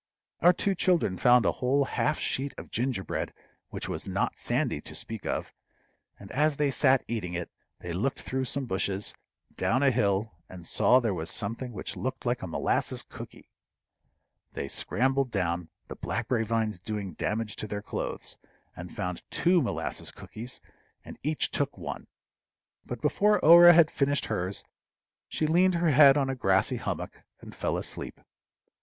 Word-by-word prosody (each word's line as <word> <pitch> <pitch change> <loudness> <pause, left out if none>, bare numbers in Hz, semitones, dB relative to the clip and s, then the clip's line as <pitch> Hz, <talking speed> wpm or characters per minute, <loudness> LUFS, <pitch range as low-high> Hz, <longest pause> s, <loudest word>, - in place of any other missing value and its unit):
Our 175 - +7
two 195 +2 0
children 175 - +2
found 125 +4 +5
a - - +4
whole 135 +3 +1
half 150 +2 0
sheet 135 +1 -2
of - - -10
gingerbread, 115 - -2 0.4
which - - -5
was - - -4
not - - -1
sandy, - - -1
to - - -9
speak 110 -3 -6
of; - - -3 0.7
and 100 - -11
as 150 +1 +2
they 145 -1 +1
sat 135 -1 +4
eating 95 -7 -3
it, 85 -1 -4 0.3
they 85 - -5
looked 115 +10 -1
through 130 0 -2
some 135 +1 -2
bushes 95 -2 -1 0.4
down 130 +4 +1
a 140 - +5
hill, 105 -2 +1 0.2
and 90 -2 -10
saw 125 +8 +4
there 115 -5 0
something 115 +6 -2
which 105 - -5
looked 130 +1 -4
like 120 0 0
a 95 - -4
molasses 80 - 0
cooky. - - -12 1.0
They 70 - -4
scrambled 135 - +1
down, 90 -5 -2 0.2
the - - -7
blackberry 115 0 -1
vines 110 -3 -1
doing 100 -2 -4
damage 105 +4 -2
to 110 - -4
their 105 0 -5
clothes, - - -4 0.4
and - - -9
found 90 -1 -3
two 175 0 +3
molasses 125 - -3
cookies, 120 +3 -8 0.4
and - - -10
each 155 +2 0
took 140 0 -1
one. - - -6 0.8
But - - -6
before 210 +1 +3
Orah 175 +2 +10
had 165 -2 +6
finished 140 0 0
hers 95 -3 -2 0.6
she 155 - -1
leaned 180 +4 +3
her 170 -2 +2
head 140 0 +7
on 140 -2 +1
a 135 - -1
grassy 95 -7 +2
hummock, - - -5 0.2
and - - -11
fell - - -1
asleep. - - -5
125 Hz, 160 wpm, -28 LUFS, 100-140 Hz, 1.0 s, Orah